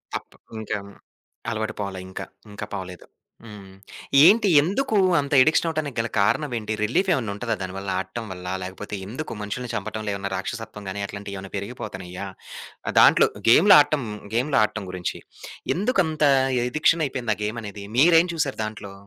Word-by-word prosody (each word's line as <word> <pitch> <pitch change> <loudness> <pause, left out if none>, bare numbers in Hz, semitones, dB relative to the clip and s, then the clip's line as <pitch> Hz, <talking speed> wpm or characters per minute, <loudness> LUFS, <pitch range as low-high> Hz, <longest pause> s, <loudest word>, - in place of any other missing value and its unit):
తప్ - - -7 0.2
ఇంకా 110 0 -3 0.7
అలవాటు 110 -1 -2
పోల. 100 -1 -4
ఇంకా 95 - -6 0.3
ఇంకా 105 +1 -6
పోలేదు. 90 -2 -7 0.4
హ్మ్, 100 -3 -11 0.5
ఏంటి? 210 +4 +6
ఎందుకు 220 - -1 0.2
అంత 140 0 -3
అడిక్షన్ 155 +4 +3
అవ్వటానికి 155 -5 -3
గల 115 - 0
కారణం 125 +8 +1
ఏంటి? 110 -1 -3
రిలీఫేమన్నా 130 - +1
ఉంటదా 115 +1 -2
దానివల్ల, 95 +1 -5
ఆడటం 95 +5 -5
వల్ల? 90 -1 -8 0.2
లేకపోతే 95 +3 -6
ఎందుకు 130 +9 -6
మనుషుల్ని 120 +4 -5
చంపటం 110 +2 -4
వల్ల 105 -1 -2
ఏమన్నా 100 0 -4
రాక్షసత్వం 105 +1 -6
గానీ, 100 +2 -4
అట్లాంటివి 100 0 -7
ఏమైనా 95 0 -10
పెరిగిపోతున్నాయా? 100 -3 -6 0.7
దాంట్లో - - +6 0.2
గేమ్లు 180 - +8
ఆడటం, 145 -2 +1 0.3
గేమ్లు 130 +5 +2
ఆడటం 105 -1 -1
గురించి 90 -1 -4 0.6
ఎందుకంత 180 -7 0 0.5
అడిక్షన్ 155 +4 +2
అయిపోయింది 130 -4 -2
ఆ - - -15
గేమనేది? 105 -2 -5
మీరేం 165 +3 +6
చూసారు 145 -5 -1
దాంట్లో? 110 -2 -7
110 Hz, 145 wpm, -24 LUFS, 100-145 Hz, 0.7 s, గేమ్లు